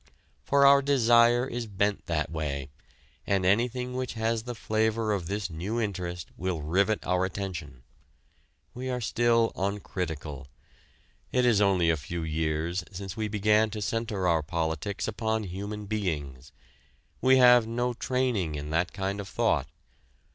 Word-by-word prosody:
For 140 0 +3
our 140 0 +7
desire 120 -3 +4
is 120 -2 -4
bent 100 0 -1
that 75 -3 -1
way, 70 -3 -3 0.6
and 95 -2 +1
anything 125 +5 +1
which 130 0 -3
has 115 0 0
the 120 +1 -6
flavor 110 0 0
of 90 -5 -3
this 100 0 -2
new 95 +9 -3
interest 90 -6 -3
will 90 -1 -2
rivet 100 +7 +1
our 90 0 +1
attention. 90 -9 -5 0.9
We 130 +1 -5
are 125 -1 -1
still 115 0 +2
uncritical. 85 -8 -4 0.8
It 125 -1 +2
is 110 -4 +4
only 95 -4 +3
a 80 - 0
few 85 +3 -5
years 80 +2 -1
since 95 -1 -6
we 110 -1 -2
began 105 +1 +3
to 110 0 -5
center 105 -3 -1
our 80 -2 +3
politics 80 +4 -2
upon 110 0 -1
human 100 +3 -5
beings. 75 -11 -3 0.7
We 130 0 +5
have 125 -2 +7
no 120 +2 -1
training 120 - -1
in 75 +1 -5
that 85 +2 0
kind 100 +1 -3
of 100 - -5
thought. 95 - +1
100 Hz, 145 wpm, -28 LUFS, 85-115 Hz, 0.9 s, our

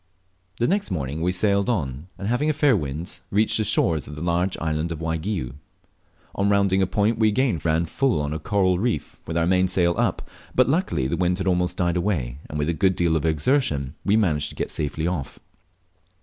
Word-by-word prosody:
The 120 - +1
next 200 +2 0
morning 75 -4 -3
we 90 +2 +1
sailed 100 +3 +2
on, 75 - -2
and 95 - -5
having 125 +7 +1
a - - +2
fair 145 -4 +3
wind 75 +1 -4
reached 105 +2 +2
the 110 - +1
shores 85 -7 +1
of 75 - -8
the 75 - -6
large 90 +2 0
island 80 +1 -2
of 80 - -4
Waigiou. 80 - -3 0.8
On 100 +1 +1
rounding 100 -1 +3
a 95 - +2
point 110 +3 +1
we 110 - +4
again 110 - +1
ran 80 +1 +1
full 130 - 0
on 75 0 -2
to 75 - -2
a - - -9
coral 95 +1 +1
reef 110 -7 -2
with 80 - -2
our 85 - +2
mainsail 90 -1 +2
up, - - 0 0.3
but 130 - +4
luckily 140 - 0
the 80 +6 -1
wind 90 0 +1
had 95 - -3
almost 90 -1 +1
died 85 -1 +1
away, 70 -10 -1
and 75 - -4
with 75 0 -1
a - - +1
good 95 +2 +2
deal 85 -2 +1
of 80 0 0
exertion 75 - +1
we 100 +2 +3
managed 75 -9 +1
get - - -3
safely 75 +1 -3
off. 80 -6 -3
90 Hz, 210 wpm, -24 LUFS, 80-100 Hz, 0.8 s, we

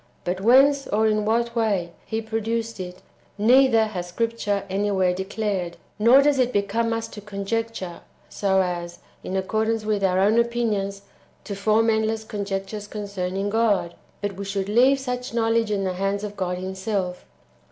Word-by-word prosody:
But 180 +2 -2
whence 275 +5 +5
or 220 +2 +1
in 215 -1 +2
what 235 +2 0
way 200 -7 0 0.2
He 225 0 -2
produced 225 0 -2
it, 180 0 -7 0.3
neither 235 +1 +5
has 180 -5 -5
Scripture 210 0 -1
anywhere 190 -1 +1
declared; 190 -2 -3 0.2
nor 245 +6 +7
does 285 -2 +3
it 250 -1 +2
become 215 +3 0
us 225 0 -2
to 210 - -9
conjecture, 200 -2 -4 0.3
so 190 -1 +1
as, 175 -1 -4 0.3
in 190 - -3
accordance 220 +3 0
with 210 -2 0
our 185 -1 +2
own 210 +4 +4
opinions, 215 -4 -1 0.4
to 205 - -5
form 215 +3 +2
endless 220 0 0
conjectures 205 -1 -4
concerning 200 -1 -3
God, 210 -6 +1 0.3
but 205 -1 -2
we 200 - -4
should 195 0 -2
leave 255 +5 +4
such 250 -2 -4
knowledge 225 -1 +2
in 200 -2 0
the 185 -1 -1
hands 195 +2 -1
of 205 -1 -5
God 180 -2 -2
Himself. 190 0 -3
210 Hz, 160 wpm, -24 LUFS, 195-225 Hz, 0.4 s, nor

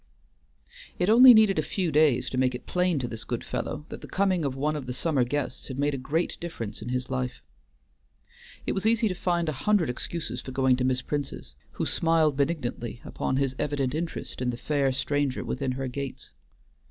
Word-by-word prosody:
It 180 +4 +2
only 250 +3 +10
needed 220 -4 +6
a - - +4
few 180 -5 -1
days 145 -5 +3
to 130 - -3
make 130 -1 +2
it 125 - -8
plain 180 -2 +1
to 130 -3 -2
this 115 -1 -5
good 120 0 -4
fellow 150 - -4
that - - -8
the - - -9
coming 185 -3 +1
of 135 -2 -1
one 150 +3 0
of 140 -4 -5
the 125 - -3
summer 145 -2 +1
guests 130 0 -3
had 130 - -6
made 145 +1 +1
a - - -2
great 160 +6 -1
difference 120 -13 -5
in 115 - -5
his 125 +1 -2
life. 125 -1 -3 1.2
It - - 0
was 195 +3 0
easy 230 0 +4
to - - -1
find 175 -2 0
a - - +1
hundred 160 +2 +1
excuses 125 -2 -4
for 130 - -8
going 130 -1 +3
to 125 - -1
Miss 130 0 +1
Prince's, 145 -2 -4 0.2
who - - -2
smiled 160 -3 +2
benignantly 130 -6 -2
upon 130 - -2
his 135 -1 0
evident 140 -3 -1
interest 165 -4 -4
in 125 - 0
the 120 - -3
fair 140 0 +1
stranger 140 0 -1
within 135 -2 -2
her 135 +1 -3
gates. 135 +1 -6
140 Hz, 205 wpm, -27 LUFS, 130-165 Hz, 1.2 s, only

